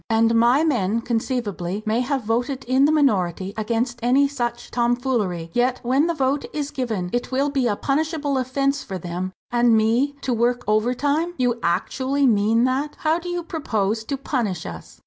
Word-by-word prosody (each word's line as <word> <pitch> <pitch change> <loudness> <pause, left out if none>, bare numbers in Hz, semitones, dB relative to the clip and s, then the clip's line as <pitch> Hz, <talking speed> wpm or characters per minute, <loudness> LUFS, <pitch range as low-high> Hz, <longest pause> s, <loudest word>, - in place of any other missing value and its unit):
"And 225 0 +3
my 240 +6 +4
men 230 - +1
conceivably 220 -5 -2
may 220 +2 +1
have 265 0 -1
voted 245 +5 -1
in 260 +3 +3
the 300 - +3
minority, 195 - +1
against 235 +2 -1
any 260 +4 +4
such 240 -4 -4
tomfoolery; 235 -9 0
yet, 250 +1 +1
when 265 +6 +2
the 340 - -1
vote 275 0 0
is 295 -1 -3
given, 220 -9 -3
it 245 +1 -2
will 275 +2 +1
be 270 -3 +1
a 210 - +1
punishable 290 +1 -1
offence 275 +2 0
for 190 - -5
them, 180 +1 -4 0.2
and 240 -1 +4
me, 235 +6 +2
to 255 - -1
work 240 +1 +1
overtime? 280 +10 +1
You 245 -2 +1
actually 260 +11 0
mean 225 0 +3
that; 265 +4 0
how 315 +2 +2
do 355 +1 -7
you 350 0 -2
propose 220 - -1
to 275 - -3
punish 230 - -2
us?" - - -9
245 Hz, 175 wpm, -22 LUFS, 220-275 Hz, 0.2 s, my